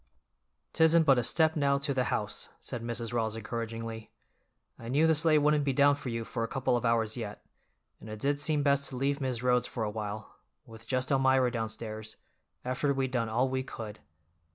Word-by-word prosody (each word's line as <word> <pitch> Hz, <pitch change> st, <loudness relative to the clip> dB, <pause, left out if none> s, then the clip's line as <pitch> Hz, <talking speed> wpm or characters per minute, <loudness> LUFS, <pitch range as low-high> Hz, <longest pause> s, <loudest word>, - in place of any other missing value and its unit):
"'Tisn't 160 Hz, 0 st, +5 dB
but 135 Hz, -4 st, +5 dB
a -, -, 0 dB
step 160 Hz, +6 st, +3 dB
now 140 Hz, -2 st, +2 dB
to 140 Hz, 0 st, -1 dB
the 130 Hz, -1 st, 0 dB
house," -, -, -3 dB
said 120 Hz, -, -5 dB
Mrs. 115 Hz, 0 st, -3 dB
Rawls 110 Hz, -2 st, 0 dB
encouragingly. 115 Hz, 0 st, -5 dB, 0.7 s
"I 115 Hz, -, -9 dB
knew 140 Hz, +6 st, +3 dB
the 160 Hz, -, +5 dB
sleigh 155 Hz, 0 st, +3 dB
wouldn't 150 Hz, 0 st, +3 dB
be 140 Hz, -1 st, 0 dB
down 145 Hz, +2 st, +5 dB
for 140 Hz, -2 st, -5 dB
you 115 Hz, -1 st, -3 dB
for 115 Hz, -, -3 dB
a -, -, -1 dB
couple 130 Hz, 0 st, 0 dB
of 120 Hz, -, -1 dB
hours 115 Hz, -1 st, +1 dB
yet, 105 Hz, -3 st, -6 dB, 0.5 s
and 110 Hz, -, -11 dB
it 110 Hz, -, -6 dB
did 145 Hz, +4 st, 0 dB
seem 150 Hz, -1 st, +1 dB
best 140 Hz, -1 st, +2 dB
to 130 Hz, -, -7 dB
leave 140 Hz, +3 st, -1 dB
Mis' 125 Hz, -3 st, -2 dB
Rhodes 125 Hz, -1 st, +2 dB
for 115 Hz, -, -4 dB
a 105 Hz, -, -2 dB
while, 105 Hz, 0 st, -6 dB, 0.3 s
with 115 Hz, 0 st, -13 dB
just 130 Hz, +1 st, 0 dB
Elmira 130 Hz, -2 st, +3 dB
downstairs, 110 Hz, -2 st, -5 dB, 0.5 s
after 130 Hz, +3 st, 0 dB
we'd 135 Hz, -1 st, -1 dB
done 115 Hz, -3 st, -1 dB
all 120 Hz, +4 st, +1 dB
we 130 Hz, 0 st, -1 dB
could. 110 Hz, -5 st, -8 dB
125 Hz, 200 wpm, -30 LUFS, 115-140 Hz, 0.7 s, Tisn't